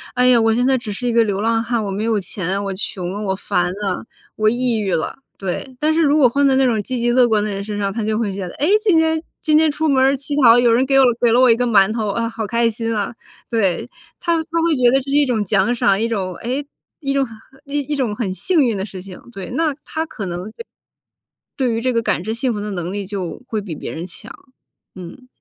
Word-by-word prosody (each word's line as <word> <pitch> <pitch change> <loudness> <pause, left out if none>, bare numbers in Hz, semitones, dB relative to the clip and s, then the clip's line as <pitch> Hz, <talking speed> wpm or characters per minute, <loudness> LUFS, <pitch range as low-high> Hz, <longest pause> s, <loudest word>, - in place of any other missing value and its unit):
哎 250 0 +3
呀， 245 -2 +5
我 225 0 +3
现 245 +3 +1
在 265 - +3
只 235 -4 -6
是 245 +5 -3
一 235 - 0
个 230 0 +5
流 200 -2 -2
浪 225 +1 +1
汉， 235 -1 -1
我 205 - -3
没 200 +2 -3
有 225 -2 +1
钱， 190 +1 -2
我 195 - -3
穷 185 -2 -3
了、 205 - -5
我 190 -2 -1
烦 180 -2 -1
了、 195 +1 -3 0.3
我 215 0 +3
抑 240 0 +1
郁 200 -4 -1
了， 160 - -2 0.2
对。 195 +7 -5
但 310 +1 +2
是 330 - +2
如 295 -1 +3
果 270 - +6
换 280 +4 +1
在 265 - +3
那 270 - +4
种 225 -4 +1
积 255 +3 -4
极 240 0 +1
乐 250 0 +5
观 220 -2 +2
的 210 - -2
人 200 0 -4
身 205 0 -5
上， 200 -1 -1
他 225 - -3
就 215 0 0
会 210 -4 -1
觉 195 - -5
得， - - -9
哎， 295 - 0 0.2
今 380 -7 +4
天 320 0 +2 0.2
今 305 -1 +3
天 315 0 +4
出 315 +2 -1
门 265 -2 +3
儿 270 +1 +4
乞 285 +2 -3
讨， 235 0 +8
有 240 -1 +4
人 250 +3 +3
给 270 0 +4
我 265 - +6 0.2
给 235 -2 +4
了 240 - +4
我 255 -1 +6
一 225 - +5
个 245 - 0
馒 200 -2 +4
头， 220 -3 -2
啊 230 +3 -1
好 225 -1 -4
开 235 +2 +2
心 230 0 -3
啊， 205 +2 -2 0.4
对， 225 0 0 0.3
他 340 -1 +1
他 330 0 -2
会 335 -2 +2
觉 250 -2 +4
得 270 - +4
这 275 - -9
是 - - +1
一 290 - +4
种 230 -5 0
奖 200 +4 +2
赏， 200 -4 +2
一 230 - +1
种 190 -6 -3
哎 255 +5 -3 0.4
一 275 -3 -2
种 275 -1 +2 0.4
呃 280 - -11
一 290 0 -1
种 245 -6 -1
很 210 -4 -2
幸 340 - +1
运 230 -3 0
的 190 - -3
事 190 -3 -9
情。 185 -1 -11
对， 195 -4 -7
那 315 -3 0
他 320 +1 -3
可 215 -10 -7
能 175 +1 -4
对 465 - -10 0.9
对 250 -4 +1
于 225 - -2
这 255 - +1
个 230 - +1
感 205 -6 0
知 220 - -3
幸 245 +1 -1
福 210 - -4
的 210 0 -4
能 175 -1 -4
力 200 -1 -4
就 190 -3 -5
会 215 -3 -2
比 180 -6 -6
别 - - -6
人 165 +2 -5
强。 210 +5 -9 0.6
嗯。 185 +8 -11
230 Hz, 295 characters per minute, -19 LUFS, 200-260 Hz, 0.9 s, 讨